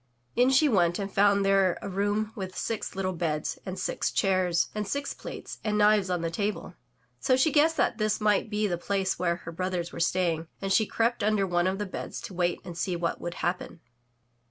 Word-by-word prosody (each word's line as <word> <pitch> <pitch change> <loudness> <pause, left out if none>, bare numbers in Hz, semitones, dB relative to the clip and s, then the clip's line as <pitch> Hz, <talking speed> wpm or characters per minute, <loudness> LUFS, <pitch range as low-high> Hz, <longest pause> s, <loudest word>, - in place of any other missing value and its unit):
In 250 +1 +4
she 270 +3 +5
went 175 -8 +3
and 200 -1 -4
found 200 0 +4
there 195 -2 +3
a - - -6
room 205 +3 -1
with 190 -3 -6
six 225 -4 -3
little 190 -1 -1
beds, 155 -3 -2
and 185 0 -4
six - - -1
chairs, 185 -3 +1
and 210 -1 -3
six 280 +6 -2
plates - - -8
and 210 -1 0
knives 210 -2 +4
on 180 -2 0
the 165 0 -2
table. 205 +4 -3 0.5
So 260 - +3
she 265 +4 +3
guessed 320 +2 +3
that 230 - +1
this 215 0 +1
might 210 0 +2
be 210 0 0
the 175 -4 -1
place 195 0 -1
where 170 -1 +1
her 170 -1 -9
brothers 180 0 -3
were - - -6
staying, 170 -2 +1
and 195 0 -1
she 220 - +3
crept 230 +1 0
imder 205 -1 +2
one 175 0 +1
of 190 +1 0
the 210 - -2
beds 190 - -6
to - - -8
wait 175 -1 0
and 175 - -7
see 180 +1 -1
what 170 0 -2
would 175 0 -4
happen. 175 -1 -3
195 Hz, 215 wpm, -28 LUFS, 175-210 Hz, 0.5 s, she